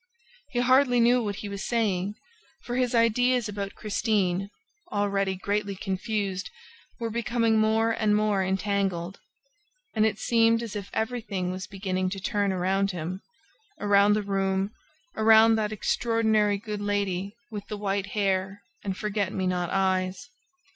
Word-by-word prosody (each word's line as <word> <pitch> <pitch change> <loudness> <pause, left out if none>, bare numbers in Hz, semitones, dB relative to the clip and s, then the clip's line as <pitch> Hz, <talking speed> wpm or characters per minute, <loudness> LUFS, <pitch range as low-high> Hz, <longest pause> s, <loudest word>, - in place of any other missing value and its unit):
He 245 -3 0
hardly 255 0 +4
knew 240 +1 +4
what 205 -2 -2
he 205 - -6
was 200 -1 -5
saying, 205 -4 0 0.5
for 240 - -4
his 250 -1 +1
ideas 240 +1 +3
about 200 -1 -5
Christine, 200 -3 0 0.4
already 200 -1 0
greatly 200 +1 -2
confused, 195 0 -3 0.5
were 230 -1 -3
becoming 230 -1 +1
more 220 +1 +3
and 215 -2 +2
more 210 -2 +2
entangled; 190 -2 -1 0.7
and 215 - +2
it 215 -2 +1
seemed 230 0 +3
as 225 -2 -6
if 200 -1 -5
everything 220 -6 -2
was 185 0 -5
beginning 185 -1 -2
to 195 +1 -5
turn 200 +1 0
around 190 +2 +1
him, 180 +1 -4 0.6
around 205 0 +4
the 210 0 0
room, 195 0 0 0.4
around 220 +1 +6
that 215 -1 0
extraordinary 220 -1 +1
good 210 0 -5
lady 200 -1 -1 0.2
with 205 -2 -6
the 210 - -5
white 200 -1 -1
hair 195 0 0 0.2
and 195 -2 -3
forget 205 -2 -1
me 190 -2 -2
not 180 -2 0
eyes. 190 +4 0
205 Hz, 145 wpm, -27 LUFS, 195-220 Hz, 0.7 s, around